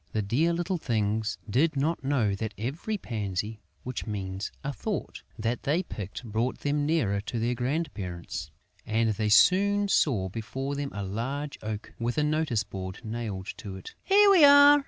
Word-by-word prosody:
The 110 - 0
dear 140 +12 +2
little 175 +1 -1
things 110 -3 0
did 145 +9 +2
not 150 +2 0
know 130 -7 +1
that 110 +1 -4
every 150 - -3
pansy 105 - -3 0.2
(which 125 -1 -5
means 95 -2 -4
"a 145 0 -2
thought") 210 +7 -4 0.2
that 115 +2 -1
they 155 +6 +1
picked 105 - -7
brought 115 +3 -1
them 145 0 0
nearer 115 -12 +1
to 115 - -4
their 115 +2 +1
grandparents; 115 - -3 0.3
and 110 0 +1
they 105 0 -1
soon 200 - +5
saw 115 - +2
before 125 +7 -4
them 140 0 -3
a 100 0 -4
large 130 +9 -4
oak 105 -1 -5
with 120 +3 -1
a 150 - +3
notice 150 -7 +1
board 95 -1 -6
nailed 110 -4 -4
to 100 -2 -7
it. 95 - -9
"Here 405 +1 +6
we 365 -6 +7
are!" 285 0 +9
120 Hz, 170 wpm, -28 LUFS, 105-150 Hz, 0.3 s, are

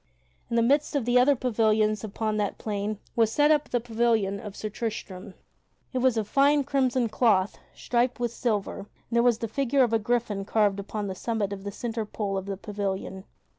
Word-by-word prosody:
In 235 - -2
the 230 - +4
midst 285 +5 +2
of 275 -5 0
the 245 +1 +4
other 280 +3 +5
pavilions 215 -4 +1
upon 215 0 -2
that 205 -2 -1
plain 210 0 -3 0.2
was 225 -2 +3
set 295 +2 +3
the 245 - -1
pavilion 225 -4 0
of 205 -1 -8
Sir 215 - -4
Tristram. 210 -4 -6 0.6
It 255 - 0
was 255 -2 +2
of 215 -2 -1
fine 285 +4 +4
crimson 260 -3 +1
cloth 210 -4 +2 0.2
striped 245 +1 0
with 240 -1 -1
silver 215 -7 -1
and 200 - -9 0.2
there 235 0 +3
was 240 -2 +3
the 230 - -3
figure 275 +3 +2
of 235 -2 0
a 225 - +4
gryphon 220 -3 -1
carved 205 -1 +1
upon 205 +1 -4
the 195 - -3
summit 205 0 -2
of 195 -1 -8
the 200 - -4
centre 225 0 -4
pole 205 -2 -3
of 190 0 -4
the 195 -1 -3
pavilion. 195 -1 -4
220 Hz, 200 wpm, -27 LUFS, 205-245 Hz, 0.6 s, other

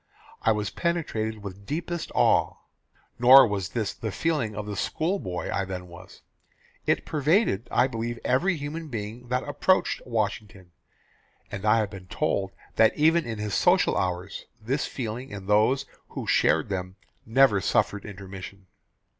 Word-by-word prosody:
I 110 - +3
was 105 -1 -1
penetrated 110 - -2
with 100 0 -9
deepest 170 +2 -3
awe. - - +3 0.6
Nor 130 +2 +9
was 100 -4 -2
this 110 -4 -2
the 110 - -5
feeling 135 -7 -1
of 105 -1 -4
the 105 -1 -5
school 165 - -1
boy 90 - -4
I 95 - 0
then 90 -1 -6
was. 90 +1 -14 0.6
It - - +1
pervaded, 150 - +1
I 125 - +3
believe, 120 -2 -3
every 175 +7 +2
human 155 +3 -5
being 115 -1 -6
that 125 +3 -1
approached 185 +6 +1
Washington; 105 -5 -3 0.8
and 100 0 -5
I 105 +1 +5
have 105 -3 0
been 95 -2 -10
told 95 +1 -1 0.3
that 110 - +4
even 160 +2 +4
in 115 -2 -4
his 105 -1 -4
social - - +3
hours, 90 +1 -3
this 125 +6 -2
feeling 125 +1 -5
in 100 -2 -8
those 110 +7 +3 0.2
who - - -6
shared - - +2
them 95 -1 -4 0.3
never 115 -3 +4
suffered 100 +3 +1
intermission. 95 -1 -9
110 Hz, 155 wpm, -26 LUFS, 100-135 Hz, 0.8 s, Nor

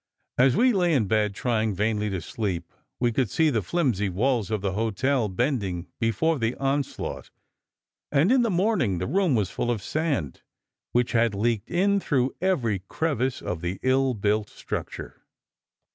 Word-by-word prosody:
As 130 0 +5
we 250 +1 +4
lay 175 -5 +2
in 120 -6 +2
bed 105 0 +1
trying 110 -4 0
vainly 105 +1 0
to 95 -3 -3
sleep, 95 -1 -4 0.3
we 120 -1 +2
could 120 -1 0
see 160 +5 +2
the 115 -4 +1
flimsy 110 - 0
walls 110 +2 0
of 110 -3 -1
the 100 -1 -1
hotel 115 +4 0
bending 95 - -1
before 130 +7 +1
the 115 +1 0
onslaught, 140 0 -2 0.8
and 150 - +3
in 260 -1 +5
the 235 - +1
morning 185 - +1
the 90 - -2
room 180 -1 +2
was 105 -5 0
full 120 - -2
of 115 -5 -1
sand 145 - -2 0.5
which 120 0 +1
had 115 -3 +2
leaked 110 +1 0
in 200 +3 +2
through 135 -7 0
every 130 - +1
crevice 135 -5 -1
of 85 -2 -3
the 90 +2 -3
ill 130 0 +2
built 105 0 0
structure. - - -6
120 Hz, 165 wpm, -25 LUFS, 105-145 Hz, 0.8 s, As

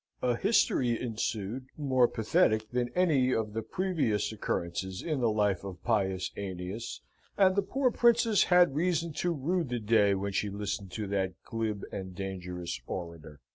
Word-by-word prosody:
A 125 -1 +2
history 125 - +2
ensued, 115 +1 -3
more 130 -4 +3
pathetic 110 -1 +1
than 125 0 0
any 150 -8 +3
of 110 -2 -2
the 115 - -2
previous 115 - -1
occurrences 95 -2 -3
in 155 -4 -1
the 120 -2 +2
life 105 -3 +1
of 95 -3 -8
Pius 95 -5 0
Aeneas, 95 +3 -5 0.4
and 190 -2 +5
the 200 - +3
poor 255 +6 0
princess 235 -3 +4
had 180 -4 +5
reason 170 +1 0
to 175 - +1
rue 170 +4 0
the 125 -5 -3
day 105 -3 +3
when 100 +1 -2
she 105 +1 0
listened 100 -1 -4
to 110 - -3
that 95 -2 0
glib 110 -3 -3
and 95 -2 -6
dangerous 90 -2 -5
orator. 85 -4 -7
110 Hz, 160 wpm, -30 LUFS, 95-150 Hz, 0.4 s, and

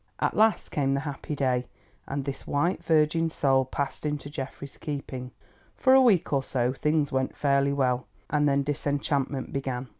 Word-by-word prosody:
At - - 0
last 220 0 +3
came 135 -2 +1
the 140 - -1
happy 145 0 -5
day, 130 -3 0 0.4
and 140 0 -3
this 140 -1 -5
white 170 +6 0
virgin 160 +1 +3
soul 135 -4 +2
passed 135 +1 -4
into 150 -1 -3
Geoffrey's 140 0 -7
keeping. 135 -4 -5 0.5
For 260 - +4
a 265 - +8
week 205 - +3
or 140 - +3
so 125 -1 -1
things 150 +1 +1
went 130 -1 -1
fairly 140 -1 +2
well, 130 -3 0 0.2
and 145 0 +2
then 140 0 +2
disenchantment 140 -1 -1
began. 130 -2 -3
140 Hz, 170 wpm, -27 LUFS, 135-150 Hz, 0.5 s, a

